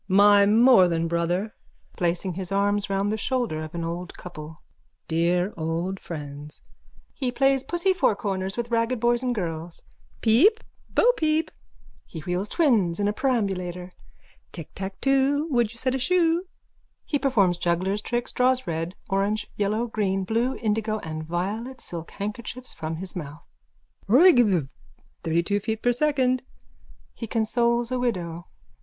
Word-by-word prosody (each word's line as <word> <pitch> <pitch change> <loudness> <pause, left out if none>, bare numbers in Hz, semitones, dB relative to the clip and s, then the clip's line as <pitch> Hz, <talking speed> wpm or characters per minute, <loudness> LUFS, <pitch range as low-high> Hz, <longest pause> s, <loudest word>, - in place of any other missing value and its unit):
_ - - -50
My 200 +1 +6
more 225 -2 +6
than 165 -1 0
Brother! 175 +5 -1 0.4
(Placing 175 0 -1
his 185 +1 -6
arms 205 +1 +1
round 195 +1 0
the 215 - -1
shoulders 230 -9 -1
of 155 - -10
an 170 - -3
old 170 +2 -5
couple.) 155 -3 -9 0.5
Dear 175 +4 +1
old 170 +4 -2
friends! 145 -2 -8 0.5
(He 255 -3 -2
plays 270 +1 +2
pussy 345 +4 +1
fourcorners 195 - -1
with 235 0 -3
ragged 230 +1 +1
boys 240 +1 +2
and 250 -1 -1
girls.) 165 -3 -5 0.4
Peep! 330 - +4 0.3
Bopeep! 320 -10 +2 0.6
(He 160 - -8
wheels 180 +5 -2
twins 215 - +2
in 205 - +1
a 205 - +1
perambulator.) 190 -8 -1 0.6
Ticktacktwo 270 - -1
wouldyousetashoe? 265 +9 +1 0.7
_(He 290 - +2
performs 200 -10 +3
juggler's 185 +4 0
tricks, 240 +2 -2
draws 255 +1 +2
red, 165 +2 -3
orange, 200 +2 0
yellow, 210 +3 0
green, 195 -4 -1
blue, 230 +6 0
indigo 215 -1 -1
and 155 0 -5
violet 205 +10 -3
silk 165 -2 -7
handkerchiefs 230 +5 -6
from 160 +1 -4
his 185 +3 -8
mouth.)_ 150 -3 -7 0.7
Roygbiv. 240 - +6 0.6
32 170 +5 +1
feet 220 +2 -4
per 245 - +4
second. 255 -1 +1 0.8
_(He 230 - -4
consoles 235 +1 +1
a 255 - 0
widow.) 175 -8 -3
205 Hz, 135 wpm, -25 LUFS, 175-245 Hz, 0.8 s, My